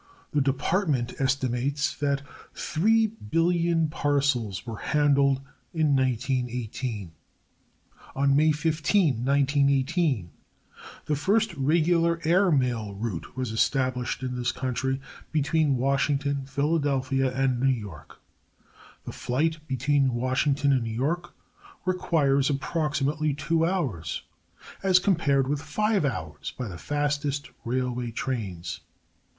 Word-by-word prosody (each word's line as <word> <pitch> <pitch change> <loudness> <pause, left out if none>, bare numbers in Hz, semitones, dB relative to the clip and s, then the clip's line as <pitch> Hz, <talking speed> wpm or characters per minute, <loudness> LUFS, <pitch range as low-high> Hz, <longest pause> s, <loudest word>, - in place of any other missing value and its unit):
The 150 - +2
Department 135 -1 0
estimates 135 +3 0
that 140 -1 0 0.3
3,000,000,000 170 - +1
parcels 140 -10 0
were 115 -3 -6
handled 140 -2 +2 0.3
in 155 -3 +3
1918. 125 -5 -2 1.0
On 140 0 +3
May 155 +2 +5
15, 155 - +1
1918, 140 - +2 0.7
the 150 - 0
first 205 +7 +1
regular 165 +3 +2
air 180 +3 +4
mail 120 -8 0
route 105 0 -5
was 130 -3 -2
established 130 +2 0
in 125 -1 -3
this 120 -1 0
country 130 +1 -2 0.3
between 150 -2 +2
Washington, 140 +1 0
Philadelphia 135 -2 0
and 130 -1 0
New 135 +2 +3
York. 105 -11 -5 0.9
The - - -5
flight 155 +6 -1
between 135 0 +1
Washington 135 +3 +1
and 130 - +2
New 115 - -3
York 170 +8 -2 0.5
requires 150 -7 +2
approximately 150 0 0
two 165 +3 +1
hours, 125 - -2 0.6
as 190 -1 +5
compared 155 -8 +2
with 145 +1 -1
five 210 +1 0
hours 80 - -4
by 125 - -3
the 85 -3 -8
fastest 145 -1 -1
railway 125 0 -2
trains. 100 -9 -4
140 Hz, 105 wpm, -26 LUFS, 125-155 Hz, 1.0 s, May